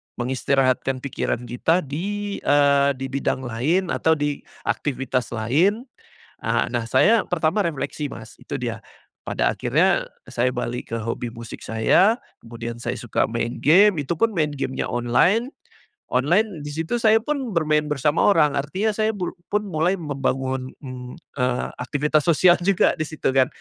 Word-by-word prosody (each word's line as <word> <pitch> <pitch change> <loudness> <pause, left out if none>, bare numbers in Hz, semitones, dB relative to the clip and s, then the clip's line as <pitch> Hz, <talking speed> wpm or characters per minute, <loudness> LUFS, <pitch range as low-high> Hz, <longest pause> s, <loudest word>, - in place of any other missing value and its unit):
mengistirahatkan 130 +1 0
pikiran 125 -3 -2
kita 145 +9 +1
di, 200 +8 -4
eee, 140 -1 +4
di 135 +1 -5
bidang 135 -1 -1
lain 150 +10 0
atau 160 0 +2
di 145 -1 -2 0.2
aktivitas 130 -2 -1
lain, 160 - +2 0.6
eee, - - +1
nah 120 -2 -2
saya 190 - +4
pertama 175 +4 0
refleksi 145 -2 -3
Mas 110 -1 -10
itu - - -6
dia - - -4 0.4
pada - - 0
akhirnya - - +2 0.2
saya 125 +2 0
balik 125 -1 -4
ke 115 - -2
hobi 115 +1 -4
musik 115 0 -9
saya 190 - +3 0.2
kemudian 115 0 -6
saya 120 0 -3
suka 120 - 0
main 120 +1 -2
game 180 +1 +5
itu 155 +4 -3
pun 225 -2 +2
main 155 -3 +1
game-nya 135 -2 -3
online, 120 - +2 0.6
online 165 - +1
di - - -5
situ 165 +10 -2
saya 225 -1 +4
pun 265 -5 -3
bermain 150 -2 +2
bersama 150 +1 +1
orang 150 -3 +3
artinya 185 +10 -1
saya 220 0 +1
blu 185 -3 -3 0.2
pun 210 0 0
mulai 165 +3 +1
membangun, 135 -5 -2
mmm, 125 -2 -8 0.2
eee, 125 -1 0
aktivitas 145 +4 0
sosial 175 +2 +5
juga 195 -2 +3
di 155 - -1
situ 155 -2 -2
kan, 130 -1 +4
145 Hz, 155 wpm, -23 LUFS, 125-175 Hz, 0.6 s, game